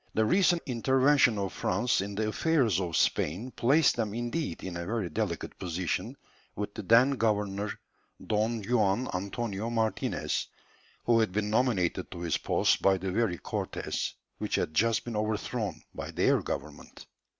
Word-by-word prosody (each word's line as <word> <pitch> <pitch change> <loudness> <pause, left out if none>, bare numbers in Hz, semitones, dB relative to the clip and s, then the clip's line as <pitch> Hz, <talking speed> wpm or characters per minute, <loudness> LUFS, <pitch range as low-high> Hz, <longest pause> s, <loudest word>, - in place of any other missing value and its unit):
The 110 - +3
recent 175 - +3
intervention 130 0 +3
of 100 -1 -2
France 105 +4 +1
in 100 +1 -5
the 110 +1 0
affairs 125 - +2
of 85 -3 -1
Spain 95 +12 0
placed 140 +5 +3
them 110 -3 -1
indeed 120 +7 -3
in 95 -2 -5
a 85 - -3
very 105 -6 -2
delicate 95 -4 -3
position 90 -1 -3 0.4
with 105 0 -4
the 110 - -5
then 115 +7 +5
governor, 105 -4 0 0.5
Don 110 +1 0
Juan 110 +1 +1
Antonio 100 +3 -3
Martinez, 110 -2 -1 0.6
who 115 -1 +4
had 110 -4 +2
been 105 +2 -1
nominated 110 -7 +1
to 85 - -8
his 85 -3 0
post - - +2
by 95 -1 +4
the 95 +1 -3
very 100 -3 +1
Cortés - - -3 0.3
which - - -1
had 80 - -1
just 115 +6 +2
been 120 -2 -4
overthrown 110 +1 -2
by - - -6
their - - +2
government. 70 +2 -7
110 Hz, 155 wpm, -29 LUFS, 95-120 Hz, 0.6 s, then